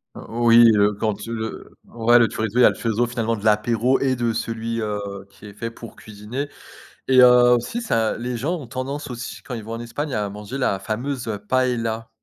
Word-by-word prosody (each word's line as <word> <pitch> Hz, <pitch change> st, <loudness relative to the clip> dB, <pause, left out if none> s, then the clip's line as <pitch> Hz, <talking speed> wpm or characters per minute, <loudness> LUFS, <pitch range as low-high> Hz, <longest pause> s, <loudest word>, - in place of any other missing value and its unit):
Heu, -, -, -9 dB
oui, 115 Hz, 0 st, +6 dB
heu, 105 Hz, 0 st, +3 dB
quand 105 Hz, 0 st, -3 dB
le 110 Hz, -1 st, -5 dB
ouais 120 Hz, +1 st, +3 dB
le 115 Hz, -, +4 dB
chorizo, 110 Hz, +2 st, -2 dB
il -, -, +6 dB
y -, -, +8 dB
a -, -, +8 dB
le -, -, -4 dB
chorizo 115 Hz, +1 st, 0 dB
finalement 115 Hz, -1 st, -1 dB
de 105 Hz, -, -10 dB
l'apéro 115 Hz, +4 st, +2 dB
et 130 Hz, -1 st, +1 dB
de 120 Hz, -2 st, -1 dB
celui, 115 Hz, 0 st, -3 dB
heu, 105 Hz, -1 st, -2 dB, 0.3 s
qui 100 Hz, -, -17 dB
est 105 Hz, -, -10 dB
fait 115 Hz, +3 st, -5 dB
pour 115 Hz, 0 st, -11 dB
cuisiner. 110 Hz, +7 st, -6 dB, 0.6 s
Et 130 Hz, -1 st, +5 dB
heu, 125 Hz, 0 st, +7 dB
aussi 120 Hz, -, -3 dB
ça 115 Hz, -, 0 dB
les 120 Hz, +1 st, -4 dB
gens 150 Hz, +10 st, -1 dB
ont 135 Hz, -, -9 dB
tendance 135 Hz, +4 st, -5 dB
aussi 125 Hz, 0 st, -7 dB
quand 125 Hz, -, -8 dB
ils 115 Hz, -, -5 dB
vont 115 Hz, +2 st, -7 dB
en 115 Hz, -, -5 dB
Espagne 125 Hz, +5 st, -5 dB
à 105 Hz, -2 st, -1 dB
manger 105 Hz, +5 st, -7 dB
la 115 Hz, -7 st, 0 dB
fameuse, 120 Hz, +6 st, -4 dB
heu, 105 Hz, -2 st, -3 dB
paëlla. 115 Hz, 0 st, -1 dB
115 Hz, 220 wpm, -22 LUFS, 110-125 Hz, 0.6 s, y